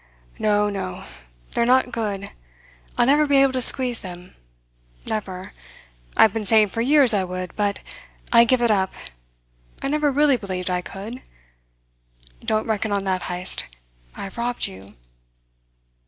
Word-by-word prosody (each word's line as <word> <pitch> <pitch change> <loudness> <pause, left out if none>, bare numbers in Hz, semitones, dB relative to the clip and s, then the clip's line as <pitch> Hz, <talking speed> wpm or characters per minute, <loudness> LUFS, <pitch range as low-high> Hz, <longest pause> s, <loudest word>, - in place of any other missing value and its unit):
"No. 210 -1 +2
No. 195 - -5 0.5
They - - -1
are - - +3
not 255 0 +3
good. 205 -4 -4 0.7
I'll - - +4
never 295 +3 +3
be 285 - +2
able 270 -1 +4
to 255 - -1
squeeze 250 -1 +6
them. 180 -1 -11 0.7
Never. 190 -4 -5 0.6
I've 220 - +5
been 225 - -3
saying 215 0 +4
for 230 - -3
years 270 -1 +6
I 200 -2 +1
would, 185 0 -6
but 205 -1 -1 0.5
I 235 0 +8
give 240 +1 +2
it 235 - +3
up. 190 -2 +1 0.9
I 275 - -3
never 300 0 +1
really 285 -1 +3
believed 185 -3 -4
I 180 0 -1
could. 210 +8 -9 1.2
Don't 215 0 0
reckon 220 -1 -2
on 200 -1 -1
that, 190 -1 -1
Heyst. 180 - -2 0.5
I - - -7
have 195 +4 -8
robbed 240 +1 -1
you." 95 +1 -10
215 Hz, 155 wpm, -22 LUFS, 190-245 Hz, 1.2 s, I